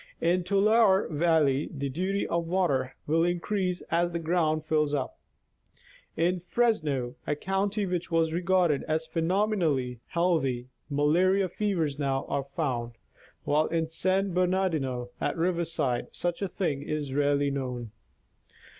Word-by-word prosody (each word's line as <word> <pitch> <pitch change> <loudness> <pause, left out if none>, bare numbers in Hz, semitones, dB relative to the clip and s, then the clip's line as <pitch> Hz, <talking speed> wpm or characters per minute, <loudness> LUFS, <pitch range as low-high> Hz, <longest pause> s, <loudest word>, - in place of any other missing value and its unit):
In 175 +2 +2
Tulare 200 +1 +4
valley, 155 -3 +2
the 140 -3 -3
duty 185 +8 -1
of 170 0 -1
water 145 -8 0
will 165 +2 +2
increase 180 +1 -1
as 175 +1 +2
the 170 - -2
ground 160 -2 0
fills 150 -2 +1
up. 135 - -4 1.0
In 175 +3 +1
Fresno, 155 - 0
a 150 - +1
county 195 +5 -1
which 180 -2 -3
was 165 -1 +1
regarded 175 -4 +2
as 160 +1 0
phenomenally 165 - 0
healthy, 135 -8 0 0.2
malarial 180 +7 +2
fevers 170 -8 -1
now 135 -2 0
are 140 - -1
found, 120 -7 -2 0.5
while 150 +2 +2
in 165 -1 0
San 185 +4 0
Bernar 185 +1 +2
dino, 130 -5 -3
at - - -1
Riverside, 165 -7 0
such 175 +1 -2
a 195 - 0
thing 155 -7 -2
is 145 -2 -3
rarely 145 0 +2
known. 125 -5 -4
165 Hz, 135 wpm, -28 LUFS, 145-185 Hz, 1.0 s, Tulare